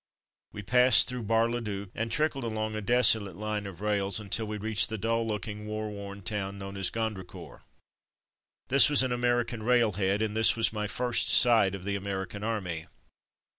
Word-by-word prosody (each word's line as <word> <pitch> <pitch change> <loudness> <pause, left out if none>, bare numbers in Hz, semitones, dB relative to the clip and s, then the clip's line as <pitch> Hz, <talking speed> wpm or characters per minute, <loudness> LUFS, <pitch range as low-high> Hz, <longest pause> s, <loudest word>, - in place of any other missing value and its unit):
We 105 - -9
passed 125 +1 +5
through 125 -3 -5
Bar 115 0 +3
le 120 +1 -3
Duc, 100 -3 -6
and 115 0 -4
trickled 145 +1 -1
along 110 -1 -3
a 110 - -4
desolate 110 -4 +3
line 105 0 -4
of 95 -1 -11
rails 100 -1 0
until 105 +1 -3
we 105 0 -5
reached 105 0 0
the 110 - -4
dull 115 +2 -1
looking, 105 -1 -5
war 110 0 -5
worn 100 -1 -9
town 100 -1 -3
known 100 0 -8
as 95 -2 +1
Gondricourt. 110 -5 -6 1.1
This 140 +2 +8
was 145 -3 +5
an 130 - -2
American 120 -1 -1
railhead, 105 -4 +1
and 110 -1 -3
this 110 0 +4
was 115 -1 +1
my 105 -1 -3
first 120 +3 -1
sight 110 -6 +5
of 95 - -10
the 100 +1 -3
American 100 0 -5
Army. 90 -8 -4
110 Hz, 180 wpm, -28 LUFS, 100-115 Hz, 1.1 s, This